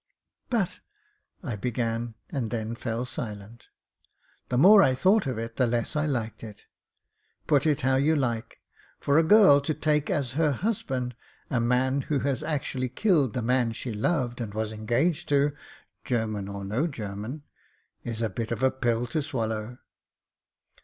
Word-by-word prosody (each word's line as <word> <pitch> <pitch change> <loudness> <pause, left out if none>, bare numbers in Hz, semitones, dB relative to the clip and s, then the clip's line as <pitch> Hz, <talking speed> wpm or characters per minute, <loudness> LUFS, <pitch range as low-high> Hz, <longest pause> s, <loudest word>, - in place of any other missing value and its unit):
"But 210 -8 0 0.3
" - - -42 0.3
I 125 -9 -3
began, 115 +1 -2 0.2
and 125 -6 -2
then 110 -1 -3
fell 115 +1 -3
silent. 110 -1 -7 0.8
The 125 - 0
more 195 +8 +8
I 130 -8 +4
thought 190 +5 +3
of 130 -4 -2
it 115 0 -5
the 125 - +3
less 120 +5 -1
I 150 0 +1
liked 115 -7 -3
it. 105 -2 -10 0.8
Put 145 +1 +3
it 150 -4 +1
how 130 +1 +2
you 150 +4 +3
like, 120 -6 -2 0.4
for 145 +2 +3
a - - +4
girl 160 -6 +7
to 150 +2 -2
take 150 -1 +1
as 140 -9 0
her 150 +1 +1
husband 130 - -2 0.4
a 125 - +1
man 130 +3 +1
who 145 +2 -1
has 140 -1 -1
actually 135 -4 -2
killed 145 - +2
the 125 - -1
man 120 -1 +1
she 120 0 -5
loved 120 +1 -1
and 105 -3 -5
was 110 0 -2
engaged 130 +10 0
to 145 0 +3 0.3
— - - -31 0.2
German 110 -5 -2
or 100 0 -6
no 115 - 0
German 110 +1 -6 0.3
— - - -43
is 115 -1 -3
a - - +2
bit 115 +3 -4
of 115 +2 -2
a 130 - +4
pill 120 -2 0
to 155 - -2
swal 130 -7 -2
low. 110 +2 -5
125 Hz, 175 wpm, -27 LUFS, 115-145 Hz, 0.8 s, more